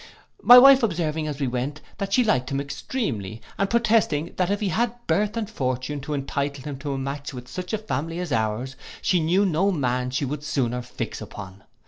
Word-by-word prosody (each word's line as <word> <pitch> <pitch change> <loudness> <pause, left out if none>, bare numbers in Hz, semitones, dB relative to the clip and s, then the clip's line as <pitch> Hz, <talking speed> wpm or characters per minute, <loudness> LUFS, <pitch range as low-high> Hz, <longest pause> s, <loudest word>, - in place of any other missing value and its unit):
My 245 - +10
wife 270 +1 +9
observing 160 -7 -1
as 150 -2 -4
we 140 - 0
went, 130 +4 -3 0.2
that 195 0 -3
she 250 +5 +4
liked 130 - +1
him 135 -1 -1
extremely, 135 - -4 0.2
and 195 - +1
protesting, 225 -10 +2
that 180 -1 +1
if 205 0 0
he 205 - -1
had 235 +4 0
birth 210 +2 +1
and 220 -2 -2
fortune 130 - -3
to 150 +2 -3
entitle 140 0 -3
him 140 -2 -6
to 140 -1 -3
match 140 +2 -4
into 125 0 -8
such 180 +5 -6
a 220 - +1
family 165 -6 -3
as 180 -3 -4
our's, 115 +3 -1 0.3
she 180 - +3
knew 175 +5 +2
no 190 +2 +2
man 125 -6 -1
she 130 +3 -1
would 145 +2 -4
sooner 125 -5 -1
fix 125 0 -6
upon. 100 -1 -10
150 Hz, 200 wpm, -24 LUFS, 130-195 Hz, 0.3 s, My